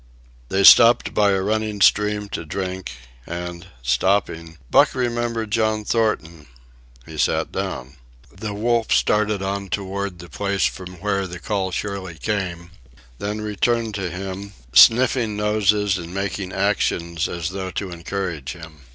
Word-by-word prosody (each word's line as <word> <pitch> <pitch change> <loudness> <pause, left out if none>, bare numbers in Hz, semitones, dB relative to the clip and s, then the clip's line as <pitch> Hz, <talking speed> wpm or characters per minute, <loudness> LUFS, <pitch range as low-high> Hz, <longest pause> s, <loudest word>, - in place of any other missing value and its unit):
They 95 +1 +1
stopped 115 +4 +7
by 105 -1 +3
a 95 -1 +1
running 110 0 -1
stream 105 +1 +3
to 85 - -4
drink, 95 0 -5 0.3
and, 85 +1 -6 0.2
stopping, 80 +5 0
Buck - - +5
remembered 120 -3 -2
John 110 -1 +1
Thornton. 85 -10 -1 0.6
He 80 -1 -9
sat - - +1
down. 65 +3 -5 0.4
The 105 +3 -5
wolf 115 +1 0
started 105 -2 +2
on 100 0 -3
toward 100 0 -3
the 85 0 -11
place 100 +4 -1
from 90 -1 -4
where 100 -2 0
the 90 0 -7
call 95 +2 -2
surely 95 -2 -4
came, 90 -4 -3 0.5
then 105 +1 -3
returned 110 +2 0
to 95 -3 -3
him, 95 +2 -6 0.2
sniffing 115 - +5
noses 105 -2 +2
and 85 0 -8
making 95 0 -3
actions 85 -4 0
as 85 -1 -3
though 95 0 -5
to 95 0 -4
encourage 85 -4 -4
him. 80 -4 -12
100 Hz, 140 wpm, -22 LUFS, 90-105 Hz, 0.6 s, stopped